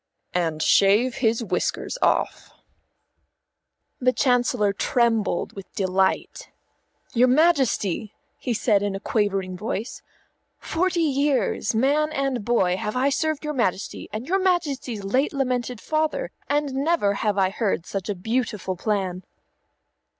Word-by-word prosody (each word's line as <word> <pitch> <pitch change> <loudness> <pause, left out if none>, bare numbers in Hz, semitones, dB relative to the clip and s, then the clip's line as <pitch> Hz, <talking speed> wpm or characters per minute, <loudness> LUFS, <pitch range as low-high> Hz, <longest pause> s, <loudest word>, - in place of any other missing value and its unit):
"And 165 -3 0
shave 210 +6 +4
his 230 -2 +1
whiskers 185 - -2
off." - - 0 1.5
The 255 0 +3
Chancellor 245 -6 +2
trembled 230 -1 +1
with 195 -2 -10
delight. 190 -1 0 0.6
"Your 250 +1 +4
Majesty," 255 - +2 0.3
he 250 - -3
said 215 -2 +2
in 205 -1 -1
a - - -4
quavering 195 -3 -1
voice, 215 +4 -4 0.6
"forty 350 0 0
years, 280 -4 +1
man 290 +6 +2
and 270 -5 -1
boy, 190 -5 +2
have 210 +2 -3
I 260 +2 +2
served 310 +1 -1
your 300 - -2
Majesty, 220 -8 -2
and 215 +4 -5
your 385 +2 +2
Majesty's 295 - -1
late 255 +11 +1
lamented 250 -3 -1
father, 315 - -1 0.2
and 290 -1 0
never 275 -7 +1
have 210 -2 0
I 190 -1 +2
heard 200 -5 -1
such 195 0 -5
a 205 - -1
beautiful 215 -1 -2
plan." 190 -2 -2
235 Hz, 130 wpm, -24 LUFS, 200-275 Hz, 1.5 s, shave